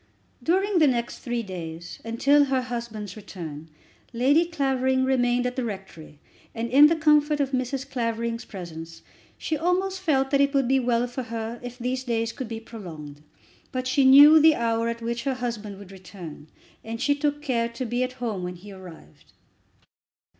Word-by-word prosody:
During 375 +6 +2
the 310 - +5
next 240 -2 -1
three 240 -1 -3
days, 170 -3 -7
and 230 0 -5
till 285 +1 +5
her 265 -2 0
husband's 235 -5 -6
return, 165 -7 -8 0.4
Lady 280 +8 +3
Clavering 265 -4 +1
remained 250 -2 +2
at 250 0 -2
the 260 - -2
rectory, 190 -8 -8 0.4
and 230 +1 -3
in 285 +3 +8
the 330 - +2
comfort 300 -1 +3
of 275 -2 0
Mrs. 260 +1 -2
Clavering's 230 -2 -2
presence 165 -3 -9 0.3
she 315 - -2
almost 370 +4 0
felt 270 -6 +1
that 280 -1 +4
it 280 0 +2
would 270 -3 +2
be 265 +1 +3
well 240 -1 +1
for 245 +1 -5
her 230 -1 -5
if 245 0 -8
those 255 +1 -2
days 230 -2 -1
could 260 - -6
be 225 0 -5
prolonged. 160 -11 -10 0.5
But 255 0 -3
she 265 +2 +2
knew 290 +4 +9
the 315 0 +6
hour 230 0 0
at 230 0 -5
which 235 +1 -3
her 270 -1 0
husband 225 -5 -5
would 195 -1 -12
return, 180 -5 -11 0.4
and 225 +1 -6
she 285 +3 +2
took 290 0 -2
care 235 -5 0
to 235 +2 -5
be 240 +2 -1
at 255 0 -1
home 235 -7 -4
when 180 0 -5
he 200 +4 -12
arrived. 180 - -14
240 Hz, 180 wpm, -25 LUFS, 215-270 Hz, 0.5 s, knew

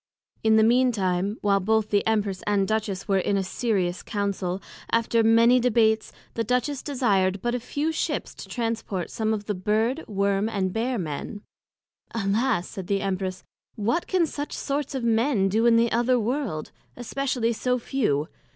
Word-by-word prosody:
In 220 0 +5
the 220 - +5
mean 250 +3 +4
time, 195 0 -1
while 200 -1 +3
both 220 +2 +1
the 205 -1 +3
Empress 205 -4 0
and 200 -2 +2
Duchess 215 -3 -2
were 195 -2 +3
in 200 +2 0
a 195 - 0
serious 185 -3 -1
Counsel, 195 -3 -2 0.3
after 230 0 +2
many 230 +2 +5
debates, 225 -2 +2 0.2
the 230 - -1
Duchess 250 +4 0
desired 200 -9 +1
but 240 0 0
a 245 - 0
few 290 +6 -2
Ships 320 - -2
to - - -10
transport 225 -6 -3
some 220 -1 -1
of 210 -2 -2
the 210 - -1
Bird 220 - 0
Worm 200 0 0
and 190 -4 -1
Bear 240 +3 -1
men: 180 +5 -5 0.7
Alas! 220 -1 +1
said 190 -3 -7
the 200 -1 0
Empress, 190 -1 -3 0.3
What 235 +11 -1
can 365 -3 +2
such 290 -1 -5
sorts 280 0 -3
of 260 - -2
Men 225 -3 +2
do 225 +4 +2
in 235 - +6
the 230 0 +3
other 240 +2 +2
World? 230 - -2 0.3
especially 245 -1 -1
so 250 +2 0
few? 210 - 0
220 Hz, 170 wpm, -25 LUFS, 195-240 Hz, 0.7 s, in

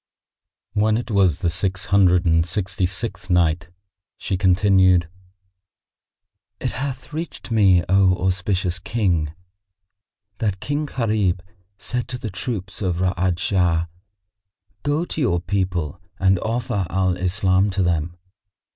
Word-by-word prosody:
When 110 +1 +2
it 120 0 -5
was 95 -5 +2
the 85 - +1
Six 95 +2 -1
Hundred 90 -2 +4
and 80 -1 +4
Sixty 90 +1 0
sixth 95 -3 -4
Night, 90 -1 +2 0.5
She 100 - -2
continued, 95 -2 +4 1.5
It - - -2
hath 135 +2 -5
reached 160 -5 -6
me, 95 -5 +4
O 95 -1 +4
auspicious 90 -1 -1
King, 85 -7 0 1.1
that 100 -4 -1
King 145 +5 -2
Gharib 105 -8 0 0.4
said 125 +4 -3
to 125 +1 -4
the 110 -4 -6
troops 95 -1 -5
of 90 -3 0
Ra'ad 90 -1 0
Shah, 85 -2 +1 1.0
"Go 150 +4 0
to 160 - -4
your 85 -10 +2
people 90 -3 -2 0.2
and 95 -1 +3
offer 115 -4 -2
Al 95 -1 +1
Islam 95 +2 +2
to 95 -1 0
them. 85 0 -1
95 Hz, 125 wpm, -22 LUFS, 90-105 Hz, 1.5 s, Hundred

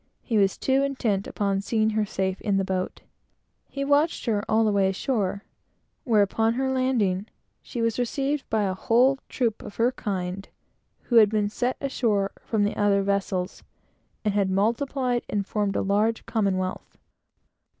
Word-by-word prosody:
He 225 -4 +1
was 195 -1 +2
too 265 0 +2
intent 240 -8 -1
upon 200 -1 -1
seeing 220 +1 +1
her 215 -1 0
safe 190 -1 -2
in 200 -2 +1
the 195 - +1
boat. 185 -1 -3 0.7
He 275 0 -3
watched 290 +3 +2
her 210 -4 0
all 225 +1 +4
the 215 - +2
way 195 -1 +3
ashore, 200 -1 -1 0.6
where, 220 -5 +4
upon 225 +3 +1
her 265 +1 0
landing, 225 -7 +1 0.3
she 235 -3 -4
was 230 +1 0
received 275 +4 -1
by 220 -1 +1
a 190 -2 0
whole 250 +7 +3
troop 230 -5 -1
of - - -10
her 235 +2 +2
kind, 195 -5 -4 0.5
who 240 - +1
had 215 -2 +7
been 210 -1 0
sent 245 +4 -1
ashore 220 -7 0
from 215 -3 0
the 205 - 0
other 200 -1 +2
vessels, 195 -2 -1 0.6
and 210 - +2
had 200 -2 +1
multiplied 240 +5 0
and 200 -1 -1
formed 205 -1 -1
a - - +1
large 210 +3 +1
commonwealth. 185 -4 -2
210 Hz, 165 wpm, -25 LUFS, 195-245 Hz, 0.7 s, had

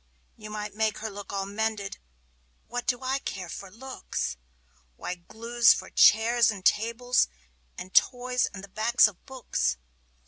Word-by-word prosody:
You 215 -1 -10
might 210 0 -5
make 220 0 0
her 220 0 -5
look 200 0 -8
all 195 -1 -2
mended 205 0 -3 0.7
but - - -35
what 245 0 -3
do 250 +1 0
I 265 +1 0
care 185 -9 -6
for 195 - -7
looks? 255 - -5 0.6
Why, 180 - -4
glue's 230 +6 +3
for - - -7
chairs 230 +2 +5
and 200 -4 -5
tables, 235 +3 +2 0.5
and 185 - -8
toys 250 0 +3
and 195 -1 -9
the - - -8
backs 220 +4 +4
of 200 -4 -11
books! 255 - -1
220 Hz, 160 wpm, -27 LUFS, 200-240 Hz, 0.7 s, chairs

